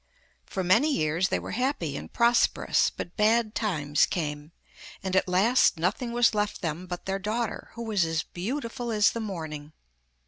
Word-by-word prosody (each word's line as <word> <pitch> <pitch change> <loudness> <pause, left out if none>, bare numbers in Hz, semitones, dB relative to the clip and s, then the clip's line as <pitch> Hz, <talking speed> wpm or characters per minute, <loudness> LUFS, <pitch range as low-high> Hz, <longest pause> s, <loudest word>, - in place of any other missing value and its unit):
For 190 - -3
many 220 - +4
years 165 - +1
they - - +1
were - - -6
happy 250 - -1
and - - -7
prosperous, 235 0 +3
but 175 - -8
bad 220 0 +2
times 150 -10 +1
came, 150 -2 -4 0.5
and 190 -1 -2
at 190 - +3
last 195 +4 +3
nothing 185 +9 -1
was 240 -1 +3
left 210 -2 -2
them 165 +2 -3
but 175 -1 -6
their 195 0 -2
daughter, 220 +3 -3
who 235 - -5
was 210 -5 +1
as 160 -1 -1
beautiful 235 +5 -4
as 210 -1 +4
the 230 - -4
morning. 160 -8 -6
195 Hz, 170 wpm, -27 LUFS, 165-230 Hz, 0.5 s, many